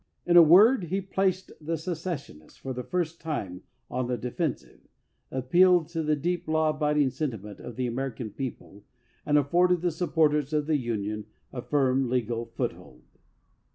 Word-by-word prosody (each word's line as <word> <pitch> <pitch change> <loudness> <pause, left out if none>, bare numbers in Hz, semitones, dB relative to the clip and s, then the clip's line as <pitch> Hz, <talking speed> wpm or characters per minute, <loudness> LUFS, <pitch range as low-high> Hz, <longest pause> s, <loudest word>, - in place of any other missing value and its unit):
In 175 - +2
a 175 - +11
word, 195 - +6
he 185 +4 -1
placed 190 -1 -1
the 165 +2 -2
secession 160 - -5
ists - - -21
for 135 - -5
the 125 - -4
first 170 +2 -3
time 100 - -4 0.3
on 125 0 -2
the 125 -1 -1
defensive, 125 +5 -4 0.5
appealed 170 +6 +3
to 165 -1 -3
the 155 -1 +1
deep 175 +4 -2
law 155 0 +2
abiding 150 -2 +1
sentiment 110 -10 -5
of 120 - -9
the 130 - -2
American 120 -2 -4
people, 110 -5 -7 0.4
and 150 0 +4
afforded 175 +5 +3
the 175 -1 +1
supporters 155 -3 +1
of 150 -1 +1
the 155 -1 +2
Union 105 -4 -3 0.3
a 125 - -4
firm, 130 0 +1
legal 120 -2 -1
foothold. 115 - -6
150 Hz, 160 wpm, -27 LUFS, 125-170 Hz, 0.5 s, a